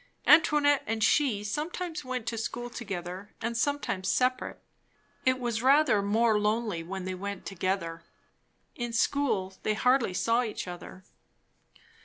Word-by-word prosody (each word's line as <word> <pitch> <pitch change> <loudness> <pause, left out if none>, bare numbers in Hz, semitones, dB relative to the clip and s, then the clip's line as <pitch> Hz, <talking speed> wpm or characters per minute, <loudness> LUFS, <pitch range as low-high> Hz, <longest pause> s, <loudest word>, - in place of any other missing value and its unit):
Antoinette 295 -2 +5
and 220 0 -1
she 245 -8 +3
sometimes 315 - -3
went 255 -3 -4
to 235 - -2
school 240 +2 -4
together 190 -3 -6
and 230 +1 -3
sometimes 230 -7 -1
separate; 255 +4 0 0.7
it 255 0 +4
was 240 -3 -2
rather 270 -4 +4
more 215 +2 +2
lonely 210 -4 0
when 185 +2 -6
they 185 - -3
went 200 +1 -6
together. 185 -3 -2 0.7
In 240 -1 -4
school 225 -6 0
they 215 - 0
hardly 250 -4 +2
saw 230 +4 +2
each 220 -6 -4
other. 180 +1 -9
225 Hz, 135 wpm, -29 LUFS, 195-255 Hz, 0.7 s, Antoinette